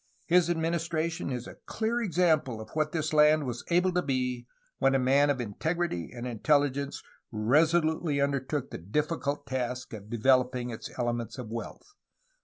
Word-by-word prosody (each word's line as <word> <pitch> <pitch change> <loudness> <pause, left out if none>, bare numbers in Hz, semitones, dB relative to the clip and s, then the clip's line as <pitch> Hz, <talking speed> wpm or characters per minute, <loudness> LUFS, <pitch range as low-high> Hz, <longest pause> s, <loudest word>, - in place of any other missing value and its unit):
His 175 -1 +4
administration 165 0 -1
is 125 -2 -4
a - - -11
clear 230 +2 -1
example 160 - +1
of 110 - -9
what 155 -1 0
this 155 -1 -2
land 150 0 +5
was 120 -2 -4
able 180 +2 +3
to 180 0 +1
be, 125 -4 -2 0.3
when 135 0 +3
a - - +5
man 135 +3 +3
of 140 -2 +1
integrity 125 - -2
and 120 0 -7
intelli 140 +4 +2
gence 140 0 -5 0.3
resolutely 155 +6 +2
undertook 140 0 -1
the - - -6
difficult 145 - -2
task 125 -1 -3
of 105 -1 -9
developing 125 +1 +2
its 110 - -7
elements 120 -2 -2
of 125 -4 -6
wealth." 115 - -7
140 Hz, 160 wpm, -29 LUFS, 125-160 Hz, 0.3 s, land